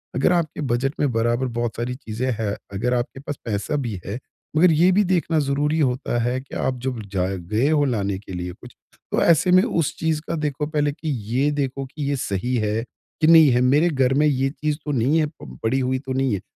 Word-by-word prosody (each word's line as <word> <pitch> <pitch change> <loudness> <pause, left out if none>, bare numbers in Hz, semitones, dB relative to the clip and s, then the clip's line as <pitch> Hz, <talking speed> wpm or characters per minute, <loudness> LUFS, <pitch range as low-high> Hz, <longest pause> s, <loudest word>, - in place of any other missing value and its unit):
अगर 135 +7 +3
आपके 160 -3 -1
बजट 135 +1 0
में 145 -3 +2
बराबर 120 +3 +1
बहुत 120 -2 -1
सारी 120 +2 -2
चीज़ें 125 0 -3
हैं, 105 -2 -1 0.2
अगर 125 +6 0
आपके 125 +2 -2
पास 145 0 -6
पैसा 105 +6 -2
भी 120 -10 -3
है, 100 +5 -4 0.4
मगर 175 +1 +6
ये 170 +4 +4
भी 205 +3 +4
देखना 175 -4 +1
ज़रूरी 145 +2 0
होता 130 -3 0
है 125 +2 0
कि 135 - -11
आप 130 -1 -1
जब 130 -3 -2
जाए 95 0 0
गए 105 +10 0
हो 150 -2 +3
लाने 100 -6 -1
के 95 -2 -10
लिए 90 0 -4
कुछ, 125 - -13 0.4
तो - - +1
ऐसे 170 +2 +4
में 185 +1 +6
उस 170 - 0
चीज़ 160 -1 0
का 165 - 0
देखो 150 -1 -2
पहले 150 -2 0
कि 155 +2 -6 0.2
ये 140 +3 +2
देखो 135 -2 -2
कि 145 -2 -3
ये 145 - +1
सही 125 0 -2
है 110 0 0 0.4
कि 155 - +4
नहीं 160 -3 +8
है? 125 0 +3
मेरे 145 +7 +4
घर 135 -4 +2
में 150 +2 +3
ये 135 -2 +1
चीज़ 150 0 -2
तो 150 - -2
नहीं 140 +5 +2
है 155 - +2
प 65 -1 -10
पड़ी 125 +4 +1
हुई 130 0 0
तो 135 -1 -5
नहीं 130 -3 +1
है। 95 - -2
135 Hz, 230 wpm, -22 LUFS, 120-150 Hz, 0.4 s, नहीं